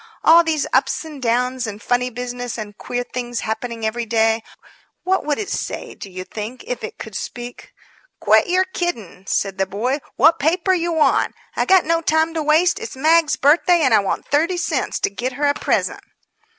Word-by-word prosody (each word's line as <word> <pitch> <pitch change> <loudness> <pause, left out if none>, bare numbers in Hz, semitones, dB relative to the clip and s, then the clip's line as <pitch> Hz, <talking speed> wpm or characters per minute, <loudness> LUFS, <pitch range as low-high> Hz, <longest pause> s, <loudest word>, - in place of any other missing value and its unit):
All 335 +1 +7
these 315 -3 0
ups - - +1
and 300 -4 -9
downs 250 +1 0
and 205 -1 -6
funny 245 +2 0
business 245 0 -5
and 210 -2 -7
queer 245 +3 -4
things 240 -1 -4
happening 225 +1 -4
every 230 +1 -2
day 225 0 +2 0.6
what 375 +2 +1
would 295 -1 0
it 420 - -4
say, - - -4
do 195 - -10
you 185 0 -7
think, 220 +6 -7
if 250 - -5
it - - -6
could 220 -3 -9
speak?" 240 +3 -7 0.5
"Quit - - +4
yer 365 +1 +3
kiddin'," 235 - -5
said 195 -1 -1
the 195 - +1
boy. 240 +9 -1 0.2
"Wot 320 +6 +5
paper 350 +5 +2
yer 345 -1 0
want? 305 -4 +2 0.2
I - - +1
got 375 -2 +5
no 330 +1 +1
time 320 0 +1
to 320 - -1
waste. 320 +6 +3
It's 450 - -7
Mag's 315 +3 +3
birthday, 335 +4 +4
and 260 -4 +3
I 220 - +6
want 195 - -2
thirty 325 +5 +1
cents - - -1
to 405 - +1
git 255 +1 -3
her 290 +3 -1
a 285 - +3
present." - - -1
260 Hz, 195 wpm, -20 LUFS, 230-330 Hz, 0.6 s, All